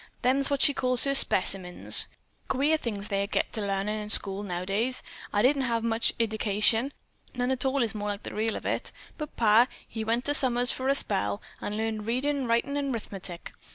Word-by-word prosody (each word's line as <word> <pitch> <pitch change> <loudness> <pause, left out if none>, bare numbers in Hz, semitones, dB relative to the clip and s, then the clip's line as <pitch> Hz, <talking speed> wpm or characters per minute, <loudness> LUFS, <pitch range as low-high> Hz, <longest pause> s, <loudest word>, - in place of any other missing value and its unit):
"Them's 270 +2 +2
what 280 -1 +1
she 285 - +6
calls 255 -2 +1
her 275 - +1
specimens. 185 -7 +2 0.4
Queer 285 +4 +1
things 210 -7 -5
they 200 -1 -1
get - - -2
to 220 - -4
larnin' 200 +1 -2
in 210 0 -6
schools 200 -1 +7
nowadays. 195 +8 -2 0.3
I 205 - +1
didn't 275 +2 +3
have 230 -3 -1
much 230 0 0
iddication. 220 +2 0 0.4
None 250 +1 -1
at 260 0 -1
all 265 -1 +1
is 225 - -3
more 210 -1 -4
like 205 0 -5
the - - -8
real 220 +1 -1
of - - -7
it. - - -2 0.3
But 300 -1 -7
pa, 225 +2 +5 0.2
he 220 - -5
went 230 +3 -1
summers 245 -2 +3
for 260 - -4
a 275 - +3
spell, 100 - +2 0.2
and 210 - -4
learned 220 -1 -3
readin', 265 +2 -1
writin' 235 +5 0
and 280 -1 -2
'rithmetic. 195 -6 -7
230 Hz, 190 wpm, -27 LUFS, 205-260 Hz, 0.4 s, schools